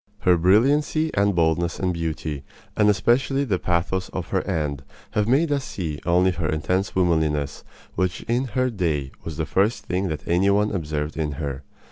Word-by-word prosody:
Her 90 -1 +5
brilliancy 140 - +3
and 100 -1 +2
boldness 85 0 +1
and 95 -2 0
beauty, 80 -3 -3 0.3
and 105 0 +4
especially 130 +6 +2
the 100 -9 0
pathos 90 +2 -1
of - - -5
her - - +1
end, 70 -3 -2 0.3
have 105 -1 0
made 145 +6 +3
us 140 -2 +1
see 80 - -4
only 90 +2 +4
her 85 -3 -2
intense 90 +6 -1
womanliness, 80 -6 +1 0.3
which 90 -1 -1
in 120 +3 0
her 130 - +3
own 125 -4 -2
day 75 -7 -1
was 80 -2 -6
the 80 - -1
first 105 +4 +1
thing 95 +1 -1
that 80 -3 -5
any 90 +3 +3
one 105 +1 +2
observed 75 -4 -3
in 75 -2 -1
her. 70 -1 -4
90 Hz, 180 wpm, -23 LUFS, 80-105 Hz, 0.3 s, Her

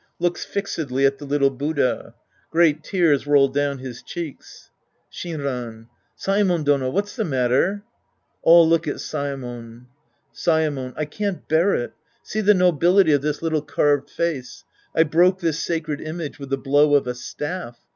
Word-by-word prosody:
{Looks 175 0 -1
fixedly 150 -9 -2
at 135 0 +1
the 145 - -8
little 140 -1 +2
Buddha. 140 0 -2 0.3
Great 160 -2 +3
tears 160 -8 +1
roll 140 -1 +5
doivn 145 0 0
his 125 -2 -8
cheeks.) 165 -5 -9 0.4
Shinran. 125 -8 -5 0.3
Saemon 195 -4 +1
Dono, 140 -3 +2
what's 200 +7 -2
the 230 - -1
matter? 135 - +1 0.6
{All 165 0 +7
look 165 0 +2
at 145 - -1
Saemon.) 125 -5 -6 0.5
Saemon. 150 -6 0
I 155 - -1
can't 200 +5 -4
bear 165 +6 +3
it. 120 - -3 0.3
See 215 - -3
the 210 0 +5
nobility 180 0 +4
of 145 -2 +3
this 150 +2 -3
little 160 -2 0
carved 145 -1 +1
face. 155 -7 -3 0.3
I 160 - +6
broke 175 +4 +3
this 165 -3 -1
sacred 160 -3 -2
image 155 -1 -6
with 140 -1 -8
the 135 - 0
blow 145 +2 +3
of 140 - +3
a 125 - -2
staff. 145 +1 -6
150 Hz, 155 wpm, -22 LUFS, 135-170 Hz, 0.6 s, All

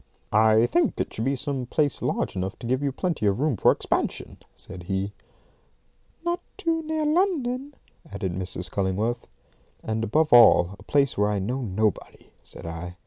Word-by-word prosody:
"I 110 +1 +5
think 175 +8 +1
it - - -2
should 110 - -3
be 135 +1 +1
some 135 -2 -3
place 145 +1 0
large - - -1
enough 95 +1 -3
to - - -9
give 130 +3 0
you 140 -1 0
plenty 160 - -1
of 100 +2 +1
room 150 -2 +1
for - - +4
expansion," - - -2 0.2
said 95 -2 -10
he. 95 +1 -2 1.1
"Not 345 0 0 0.2
too 330 -4 0
near 315 -1 -1
London," 290 -6 0 0.4
added 95 -3 -3
Mrs. 90 0 -5
Cullingworth. 105 +5 -1 0.6
"And, 110 0 -2
above 150 +7 +2
all, 105 -6 +7
a - - -14
place 140 -6 +1
where 105 0 +3
I 105 - 0
know 120 +8 -2
nobody," 105 -2 -2
said - - -9
I. 85 +2 -6
120 Hz, 170 wpm, -25 LUFS, 100-155 Hz, 1.1 s, all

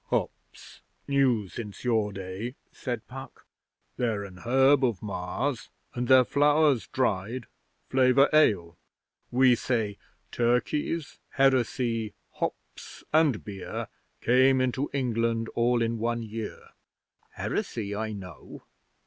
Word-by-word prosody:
'Hops. - - -4 0.3
New 130 -7 +2
since 105 +3 -8
your 110 -4 +1
day,' 100 +5 -6 0.2
said 120 -4 -5
Puck. 135 +1 -10 0.5
'They're 110 -4 0
an 95 -2 -10
herb 135 +6 +4
of 115 -7 0
Mars, 105 +7 -3 0.2
and 125 0 -2
their 130 0 +7
flowers 145 -2 +3
dried 115 0 -1 0.4
flavour 130 +1 +4
ale. 90 - +3 0.5
We 130 0 +5
say 110 -4 -1 0.3
'Turkeys, 125 +6 0
Heresy, 120 -4 +1 0.2
Hops, - - -6
and 155 -7 +3
Beer 100 -3 -6 0.3
Came 130 +2 +4
into 130 +2 0
England 115 -3 0
all 120 0 +2
in 115 0 -1
one 115 +1 -1
year.' 110 0 -7 0.7
'Heresy 105 -3 -3
I 110 +1 -3
know. 90 -5 -10
120 Hz, 110 wpm, -27 LUFS, 110-130 Hz, 0.7 s, their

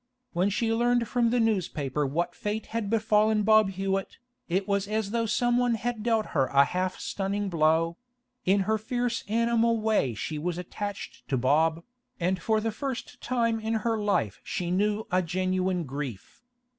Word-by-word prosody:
When 180 +3 +2
she 225 +3 0
learned 240 0 +2
from 240 -1 +2
the 245 +1 +2
newspaper 155 - 0
what 170 +6 -1
fate 210 +1 -3
had 225 -3 -1
befallen 215 -1 +3
Bob 215 -1 +5
Hewett, 195 0 -2 0.3
it 190 +3 0
was 200 -1 0
as 215 -1 -1
though 230 0 0
someone 240 +1 +2
had 235 0 -3
dealt 225 -1 +1
her 135 -4 +2
a 140 +2 +5
half 185 +4 -2
stunning 200 +1 -2
blow; 165 0 +2 0.5
in 195 +2 +3
her 220 +3 +1
fierce 240 +2 -2
animal 230 +1 +2
way 215 - +1
she 150 +8 -4
was 175 +2 -2
attached 200 +3 -6
to 135 - +1
Bob, 160 +6 +2 0.4
and 180 +1 0
for 220 +4 +2
the 225 +1 -1
first 260 +2 -5
time 230 -2 0
in 220 +1 -1
her 230 -1 +2
life 205 - 0
she 175 -1 -3
knew 210 +3 +1
a 185 +1 +3
genuine 185 0 0
grief. 135 - -6
205 Hz, 170 wpm, -27 LUFS, 175-225 Hz, 0.5 s, Bob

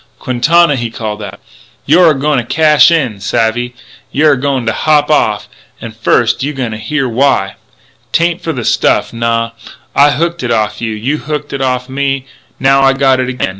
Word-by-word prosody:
"Quintana," 150 +5 +2
he 120 -1 -3
called 110 -2 -5
out, 105 - -8 0.5
"you're 175 -1 +5
a - - +3
going 145 -1 +1
to - - -3
cash 150 +3 +4
in. 135 -11 0
Savvy? 115 +4 -1 0.4
You're 150 +2 +3
a 130 - -2
going 135 -3 -1
to 110 - 0
hop 150 -1 +1
off. 105 -7 +1 0.3
An' 115 - -8
first 115 +2 +1
you 145 +3 -2
gotta 120 -5 -4
hear 130 +6 -2
why. 115 -5 +1 0.6
'Tain't 170 +1 0
for 165 - -3
the 125 -7 -5
stuff. - - +1
Naw! 115 0 -1 0.4
I 145 +1 +5
hooked 170 +3 -1
it 120 - -3
off'n 110 0 -1
you; 110 - -3
you 130 +8 -2
hooked 150 -1 -5
it 140 - -3
off'n 130 0 -2
me; 135 -1 -1 0.3
now 135 +1 +3
I 135 0 +4
got 135 -1 +2
it 130 0 -1
again. 125 -6 -2
130 Hz, 190 wpm, -13 LUFS, 115-150 Hz, 0.6 s, you're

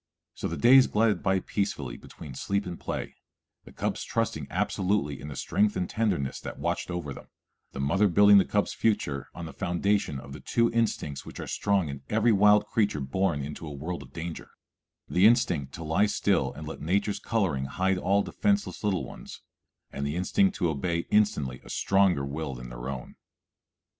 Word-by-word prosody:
So - - -4
the 85 - -4
days 130 - +7
glided 105 -3 +2
by 95 0 +1
peacefully 90 - -2
between 70 +3 -11
sleep 100 +9 -1
and 90 -2 -6
play, - - -5 0.5
the - - -13
cubs - - -3
trusting 115 - -2
absolutely 95 -7 0
in 75 - -7
the 70 - -7
strength 105 0 +1
and 90 -1 -1
tenderness 100 - -1
that - - -7
watched - - -2
over 85 -6 -4
them, - - -12 0.5
the - - -6
mother 95 +10 +3
building 100 +2 +7
the 95 - +3
cubs' 105 0 0
future 70 - 0
on 85 - -6
the 80 - -8
foundation 95 -4 0
of 70 +1 -10
the 75 - -8
two 115 0 +1
instincts 105 - -1
which - - -10
are - - -4
strong 100 -5 0
in 70 -1 -6
every 115 +2 +3
wild 105 0 +5
creature 105 -7 0
born 70 +2 0
into 75 +3 -7
a - - -6
world 80 +5 -5
of - - -13
danger, 85 0 -6 0.6
the 95 +4 +5
instinct 85 - +2
to 85 - -7
lie 80 +7 +2
still 105 - +1
and 75 +3 -9
let 80 - -7
nature's 100 +6 0
coloring 90 -13 0
hide 95 +7 0
all 100 +2 +2
defenseless 205 - -1
little 100 -4 0
ones, - - -10 0.5
and 70 - -4
the 70 +2 -2
instinct 195 - +2
to 85 - +1
obey 85 +3 -1
instantly 75 -12 +1
a - - -14
stronger 95 -7 +2
will 70 0 -4
than - - -8
their - - -6
own. 65 -3 -7
90 Hz, 190 wpm, -28 LUFS, 70-105 Hz, 0.6 s, days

